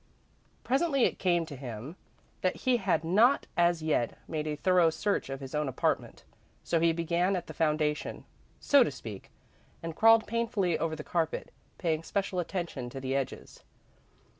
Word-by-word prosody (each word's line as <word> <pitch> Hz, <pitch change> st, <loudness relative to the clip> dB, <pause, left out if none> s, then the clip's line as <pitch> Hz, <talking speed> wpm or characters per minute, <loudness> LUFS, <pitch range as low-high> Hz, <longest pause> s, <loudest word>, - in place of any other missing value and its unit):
Presently 275 Hz, 0 st, +2 dB
it -, -, -1 dB
came 175 Hz, -2 st, +2 dB
to 155 Hz, -3 st, -8 dB
him 125 Hz, +3 st, -7 dB, 0.5 s
that 185 Hz, -, +1 dB
he 255 Hz, -1 st, +4 dB
had 180 Hz, -7 st, 0 dB
not 215 Hz, +11 st, +4 dB
as 170 Hz, -2 st, +2 dB
yet 150 Hz, -7 st, 0 dB
made 155 Hz, -1 st, -3 dB
a 150 Hz, -, -1 dB
thorough 180 Hz, +1 st, +4 dB
search 180 Hz, +1 st, -1 dB
of 135 Hz, 0 st, -5 dB
his 135 Hz, -1 st, -8 dB
own 150 Hz, -2 st, 0 dB
apartment, 130 Hz, -, -1 dB, 0.4 s
so 170 Hz, -, +1 dB
he 165 Hz, 0 st, +4 dB
began 170 Hz, +3 st, 0 dB
at 175 Hz, -2 st, -3 dB
the -, -, -9 dB
foundation, 150 Hz, -1 st, -1 dB, 0.3 s
so 280 Hz, -2 st, +5 dB
to -, -, -1 dB
speak, 110 Hz, -7 st, -9 dB, 0.5 s
and 165 Hz, -1 st, -5 dB
crawled 225 Hz, +2 st, +6 dB
painfully 225 Hz, -7 st, 0 dB
over 160 Hz, -1 st, -1 dB
the 155 Hz, -, -7 dB
carpet, 165 Hz, -1 st, -2 dB, 0.3 s
paying 160 Hz, -3 st, 0 dB
special 190 Hz, +2 st, -2 dB
attention 170 Hz, -8 st, -4 dB
to 135 Hz, -, -7 dB
the 135 Hz, 0 st, -2 dB
edges. 135 Hz, -1 st, -4 dB
165 Hz, 165 wpm, -30 LUFS, 150-190 Hz, 0.5 s, crawled